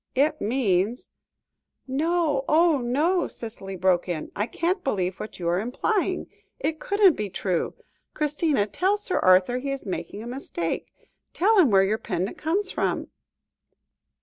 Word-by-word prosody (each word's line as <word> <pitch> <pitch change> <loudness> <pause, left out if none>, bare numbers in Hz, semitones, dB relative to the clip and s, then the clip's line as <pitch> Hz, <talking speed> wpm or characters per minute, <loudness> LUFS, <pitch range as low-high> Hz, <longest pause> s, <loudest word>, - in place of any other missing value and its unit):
It 285 +4 +2
means 210 -1 0 0.4
" - - -57
"No, 305 +1 +1
oh, 320 -1 +4
no!" 300 +10 +1
Cicely 205 -4 -6
broke 180 -1 +1
in. 165 -3 -4
"I 205 +2 -1
can't 355 - -1
believe 185 -7 -1
what 215 - -7
you 170 - -3
are 175 +1 +2
implying. 365 - -1 0.3
It 315 0 -2
couldn't 400 -3 +4
be 210 -5 -4
true. 180 -2 -2 0.4
Christina 300 -6 +1
tell 375 - +1
Sir 405 -2 -2
Arthur 185 +7 +4
he 275 +2 -4
is 275 -2 -4
making 185 +2 -5
a - - -8
mistake. 240 -9 -4 0.4
Tell 415 +4 +4
him 320 -8 +6
where 195 -2 +5
your 210 +3 0
pendant 185 -1 -3
comes 375 +6 -1
from." - - -1
250 Hz, 150 wpm, -25 LUFS, -, 0.4 s, him